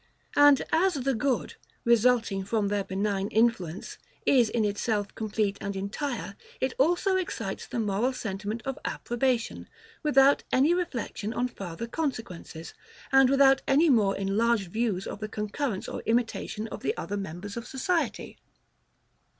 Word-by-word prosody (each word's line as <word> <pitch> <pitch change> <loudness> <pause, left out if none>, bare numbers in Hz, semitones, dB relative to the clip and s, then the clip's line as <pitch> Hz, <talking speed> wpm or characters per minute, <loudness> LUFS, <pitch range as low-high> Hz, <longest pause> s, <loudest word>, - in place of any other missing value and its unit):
And 290 -1 +6
as 360 +2 +3
the 270 0 0
good, 260 +2 -1 0.3
resulting 235 -4 +3
from 205 0 0
their 205 -1 0
benign 195 +1 -1
influence, 210 -6 0 0.3
is 245 -5 +4
in 225 -2 +1
itself 205 0 -1
complete 210 -2 -1
and 200 -1 -3
entire, 200 +2 -4 0.2
it 260 0 0
also 355 +6 +3
excites 375 0 -4
the 240 - -3
moral 215 +4 +1
sentiment 215 -2 -4
of 270 -1 -3
approbation, 240 -1 -1 0.3
without 280 -2 +4
any 280 +6 +4
reflection 245 - -3
on 245 +1 0
farther 195 -3 -6
consequences, 225 - -5 0.4
and 270 -1 +6
without 270 0 +5
any 295 +3 +5
more 205 -5 +3
enlarged 200 0 +1
views 220 -5 0
of - - -6
the 215 0 -5
concurrence 210 +1 -3
or - - -5
imitation 225 -2 -1
of - - -7
the - - -1
other 205 - -4
members 195 +1 -6
of 235 0 -6
society. 275 - -2
230 Hz, 140 wpm, -28 LUFS, 200-270 Hz, 0.4 s, And